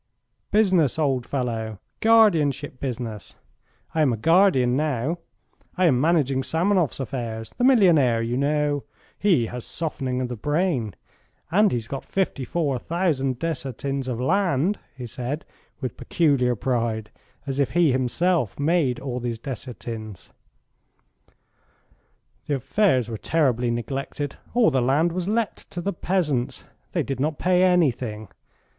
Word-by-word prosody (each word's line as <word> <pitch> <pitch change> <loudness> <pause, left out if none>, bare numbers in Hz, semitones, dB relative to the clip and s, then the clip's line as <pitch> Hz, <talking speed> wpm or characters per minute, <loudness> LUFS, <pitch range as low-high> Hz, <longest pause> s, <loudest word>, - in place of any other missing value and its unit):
"Business, 185 - +3
old 135 -5 0
fellow. 115 -5 -3 0.2
Guardianship 160 - +3
business. 120 -5 -5 0.6
I 160 - +1
am 145 -4 +4
a 115 - -1
guardian 160 - +4
now. 150 +2 -1 0.6
I 185 - +3
am 130 -7 +3
managing 145 -5 +2
Samanoff's 170 +1 +1
affairs 115 -3 -5
the - - +1
millionaire, 170 - +5
you 120 +1 -2
know. 145 +1 +1 0.4
He 175 - +3
has 125 +1 -6
softening 135 -6 -3
of 130 - -1
the 125 - -5
brain, 145 - -1 0.6
and 205 +3 +4
he's 115 -2 -2
got 135 +1 -5
fifty 190 -8 -1
four 140 -2 -1
thousand 145 -6 0
desiatins 135 -2 -3
of 120 -2 -3
land," 175 +4 +1 0.2
he 125 - -6
said, 130 +5 -4 0.4
with 130 -4 -4
peculiar 135 -7 +2
pride, 115 -2 -1 0.3
as 135 0 -3
if 140 - +2
he 170 -4 +4
had 130 - +1
himself 160 - 0
made 145 -4 +1
all 130 -2 -4
these 120 -2 -3
desiatins. 115 - -7 2.1
"The 145 - +1
affairs 135 - +2
were 115 -2 -5
terribly 125 -4 +1
neglected. 135 +4 -3 0.2
All 240 -9 +5
the 130 -2 +2
land 145 +7 +2
was 180 +1 -3
let 220 +1 0
to 180 - -6
the 200 +3 -2
peasants. 160 -9 -1 0.3
They - - 0
did 135 -2 -4
not 150 +2 0
pay 180 0 +2
anything. 125 - +1
140 Hz, 140 wpm, -24 LUFS, 125-170 Hz, 2.1 s, millionaire